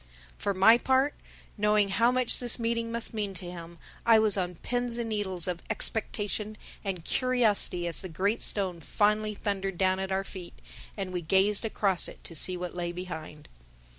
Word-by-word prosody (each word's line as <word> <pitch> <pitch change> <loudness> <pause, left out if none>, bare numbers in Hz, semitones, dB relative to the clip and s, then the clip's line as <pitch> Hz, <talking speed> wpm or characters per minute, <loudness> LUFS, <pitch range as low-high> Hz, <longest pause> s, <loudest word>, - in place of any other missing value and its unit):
For 200 - -1
my 225 +5 +6
part, 265 +3 +2 0.5
knowing 210 -1 +3
how 230 +5 +3
much 255 -1 +3
this 240 -2 +1
meeting 230 -1 -2
must 235 0 -1
mean 205 -3 -3
to 175 -1 -4
him, 170 -1 -10 0.3
I 230 -1 +6
was 215 -2 +5
on 180 -2 -2
pins 245 +5 -2
and 235 -1 -3
needles 190 -5 -2
of 175 -1 -3
expectation 210 -1 -2 0.3
and 185 -4 -4
curiosity 230 -8 +1
as 170 -2 +1
the 185 - -7
great 200 +7 0
stone 185 -4 +4
finally 210 +3 0
thundered 195 -3 -3
down 185 0 +2
at 190 0 -4
our 190 0 0
feet 185 -3 -9 0.4
and 190 -2 -4
we 180 - -2
gazed 195 +6 +2
across 200 -4 +2
it - - -12
to - - -7
see 180 +3 +1
what 180 -1 -5
lay 175 -1 -3
behind. 160 -4 -8
200 Hz, 180 wpm, -28 LUFS, 180-220 Hz, 0.5 s, my